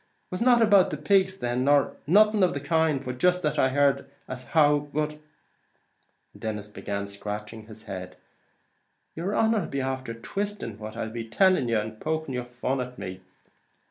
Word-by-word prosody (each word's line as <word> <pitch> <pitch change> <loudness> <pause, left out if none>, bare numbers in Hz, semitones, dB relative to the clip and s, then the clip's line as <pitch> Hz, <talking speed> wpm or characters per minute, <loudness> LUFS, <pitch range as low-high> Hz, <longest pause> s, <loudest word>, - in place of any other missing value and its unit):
It - - -43
was 185 - -4
not 240 -1 +5
about 205 -4 +5
the 150 - -4
pigs 190 +5 +2
then, 120 -2 -1
nor 145 -1 +3
nothing 210 +4 +5
of 180 -4 +3
the - - -1
kind, 150 -1 +1
but 125 0 -5
jist 180 +2 +3
that 150 - 0
I 130 - +4
heard 140 0 +2 0.2
as 125 0 -7
how, 145 -2 +3
but 150 +1 0
" 150 0 -26
and - - -17
Denis 105 -2 -3
began 100 -1 -4
scratching 105 +2 -7
his 110 0 -12
head 95 -3 -7 1.0
"yer 180 +5 -2
honer 220 -4 +2
'll - - -12
be 140 - -2
after 130 -3 -3
twisting 195 - -4
what 110 0 -7
I'll 110 - -3
be 115 -1 -6
tellin' 185 - +3
yer, 115 -1 +2
and 110 0 -7
poking 155 -3 -2
your 125 -1 -3
fun 125 +2 -2
at 125 0 -7
me." 95 0 -7
135 Hz, 190 wpm, -26 LUFS, 115-165 Hz, 1.0 s, not